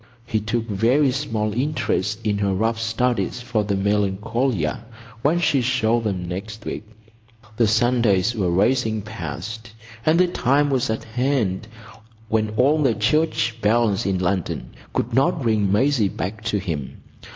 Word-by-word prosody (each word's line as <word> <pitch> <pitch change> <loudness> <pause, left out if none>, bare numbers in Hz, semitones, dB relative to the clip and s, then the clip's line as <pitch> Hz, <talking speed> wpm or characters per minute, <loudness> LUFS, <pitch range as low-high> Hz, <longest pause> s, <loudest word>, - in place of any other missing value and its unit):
He 115 -2 0
took 115 +2 -2
very 120 +7 +3
small 115 -6 -2
interest 120 -6 -1
in 105 -2 0
her 100 -2 +1
rough 110 +3 0
studies 120 +2 0
for 115 -3 -1
the 100 -1 -1
Melancolia 105 - 0 0.4
when 150 +7 +2
she 150 -5 +2
showed 120 -2 +1
them 95 -4 -2
next 105 +4 -6
week. 105 - -6 0.7
The 115 - +4
Sundays 115 -2 +2
were 100 -6 0
racing 110 +3 +1
past, 110 +3 -7 0.3
and 160 +4 +3
the 180 - +6
time 145 -3 +2
was 130 -4 +1
at 110 - -2
hand 120 -5 -1 0.6
when 110 -1 +1
all 145 +5 +4
the 130 -6 +2
church 120 -1 +1
bells 105 -2 +2
in 95 -1 +1
London 90 -1 -2 0.2
could 115 - -2
not 140 +2 +2
ring 105 -4 +2
Maisie 120 -1 +3
back 100 +4 -5
to 105 -2 +1
him. 80 -9 -4
110 Hz, 150 wpm, -22 LUFS, 100-125 Hz, 0.7 s, the